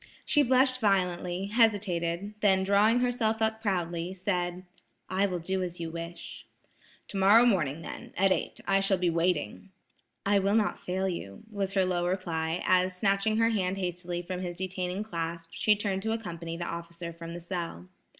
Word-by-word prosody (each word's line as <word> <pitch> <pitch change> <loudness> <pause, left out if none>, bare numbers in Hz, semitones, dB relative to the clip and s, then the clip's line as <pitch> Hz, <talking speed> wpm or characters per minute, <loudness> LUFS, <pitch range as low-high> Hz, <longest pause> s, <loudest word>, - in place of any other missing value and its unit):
She 295 - +4
blushed 255 -1 +3
violently, 180 -2 +1
hesitated, 200 -4 +1
then 190 -3 +3
drawing 210 +5 +4
herself 235 -3 +1
up 220 0 0
proudly 175 -3 -1
said: 180 -1 -2 0.5
"I 195 +2 +2
will 180 -2 -2
do 190 +3 -2
as 180 -1 -4
you 165 -1 -4
wish." 170 +1 -8 0.6
"Tomorrow 205 +4 +5
morning 165 - +1
then, - - -8
at 195 +1 +4
eight, - - -1
I 195 0 +3
shall 195 0 +2
be 180 -1 +1
waiting." 165 - -1 0.6
"I 200 0 +4
will 200 +2 +2
not 220 -2 +1
fail 190 +1 -2
you," 100 - -5
was 195 -2 -2
her 190 -2 +3
low 175 -1 0
reply, 170 -2 -1
as 185 0 +3
snatching 200 +2 +2
her 225 0 +4
hand 190 -3 0
hastily 175 -1 -3
from 180 +1 -4
his 175 -1 -5
detaining 185 +1 -3
clasp, 165 -4 -4
she 210 +4 +3
turned 200 -2 -2
to 220 +2 -1
accompany 170 -6 -5
the 175 - -3
officer 170 0 -6
from 170 0 -8
the - - -5
cell. 170 - -5
185 Hz, 170 wpm, -29 LUFS, 170-200 Hz, 0.6 s, Tomorrow